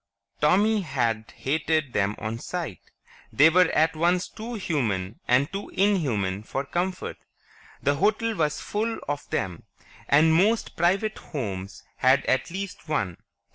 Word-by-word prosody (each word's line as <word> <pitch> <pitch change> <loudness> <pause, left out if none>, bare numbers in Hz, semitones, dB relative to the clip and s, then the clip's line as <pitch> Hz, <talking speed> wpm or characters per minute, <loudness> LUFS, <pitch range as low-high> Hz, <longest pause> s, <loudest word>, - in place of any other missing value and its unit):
Tommy 205 +8 +3
had 115 - -1
hated 155 -1 0
them 105 +1 +1
on 110 +1 -4
sight; 165 - -5 0.5
they 155 +3 +6
were 180 0 +5
at 160 +1 +2
once 175 +4 +2
too 235 +2 -7
human 115 - -2
and 135 +7 +3
too 200 +1 -5
inhuman 130 - +1
for 135 +5 -4
comfort. 180 +5 -3 0.7
The 145 - +3
hotel 225 +6 +1
was 150 -5 0
full 225 +2 -2
of 145 0 -4
them, 90 -3 -2 0.5
and 155 +3 +5
most 210 +7 +2
private 195 +5 +1
homes 100 - -5
had 130 +1 +4
at 130 - +1
least 185 -2 -6
one. 100 - -1
155 Hz, 135 wpm, -26 LUFS, 120-185 Hz, 0.7 s, they